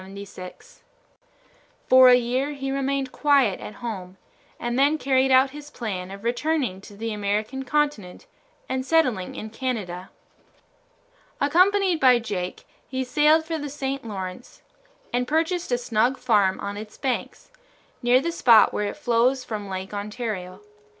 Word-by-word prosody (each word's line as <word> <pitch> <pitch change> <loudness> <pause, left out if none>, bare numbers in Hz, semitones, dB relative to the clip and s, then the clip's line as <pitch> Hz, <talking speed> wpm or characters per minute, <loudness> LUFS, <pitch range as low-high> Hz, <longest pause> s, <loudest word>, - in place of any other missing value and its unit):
For 255 0 +8
a 250 - +8
year 250 +4 0
he 270 -1 -4
remained 275 -1 -1
quiet 280 -9 +2
at 210 - -9
home, 190 -5 -6 0.4
and 240 +1 -2
then 290 +3 +4
carried 265 -2 +2
out 260 +1 +5
his 295 +1 -10
plan 190 -9 -5
of 200 +1 -10
returning 245 -4 -1
to 205 0 -13
the 225 +1 -3
American 210 +5 -2
continent 285 - -2 0.4
and 260 0 -2
settling 255 - +1
in 220 - -7
Canada. 210 -8 -4 1.3
Accompanied 365 +4 +3
by 255 -3 +6
Jake, 195 -6 -5 0.2
he 260 0 -2
sailed 305 +5 +3
for 325 -1 -3
the 290 0 -5
St. 275 -1 -4
Lawrence 190 0 -7 0.5
and 245 0 0
purchased 325 +2 0
a 245 - +3
snug 240 +2 +1
farm 205 -6 +2
on 200 0 -5
its 215 0 -9
banks, 265 - -4 0.5
near 245 +1 +4
the 335 +5 -2
spot 235 -9 +5
where 210 - -1
it - - -6
flows 250 -1 +1
from 210 -4 -6
Lake 190 +1 -5
Ontario. 205 -3 -5
250 Hz, 145 wpm, -24 LUFS, 210-275 Hz, 1.3 s, For